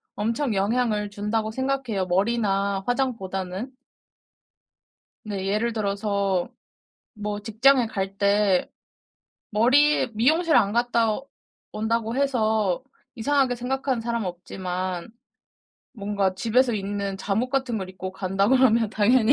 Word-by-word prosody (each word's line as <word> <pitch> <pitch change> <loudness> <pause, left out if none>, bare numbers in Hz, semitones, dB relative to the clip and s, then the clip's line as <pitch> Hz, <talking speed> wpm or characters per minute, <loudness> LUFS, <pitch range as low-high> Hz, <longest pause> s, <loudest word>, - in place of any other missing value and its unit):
엄청 230 +4 -1
영향을 210 +1 0
준다고 215 +1 -2
생각해요, 260 -5 -1
머리나 200 0 +1
화장보다는. 220 -4 -2 1.5
네. 200 -3 -4
예를 215 +4 0
들어서 200 -3 -1 0.7
뭐 210 -1 -4
직장에 235 +4 +3
갈 195 -4 -4
때 200 -2 +2 0.8
머리에 260 +8 +4
미용실 315 +9 +3
안 205 -3 +3
갔다 235 -1 +1 0.5
온다고 225 +2 -1
해서 220 -8 +1 0.3
이상하게 270 +1 +1
생각하는 260 +1 -2
사람은 235 -2 -2
없지만 180 +1 -4 0.8
뭔가 200 -4 -1
집에서 235 +5 +2
입는 200 -1 -3
잠옷 210 +6 -1
같은 265 -3 0
걸 190 -2 -5
입고 185 0 -7
간다 195 +1 0
그러면 235 -4 +4
당연히 225 +3 +4
215 Hz, 255 characters per minute, -24 LUFS, 195-245 Hz, 1.5 s, 머리에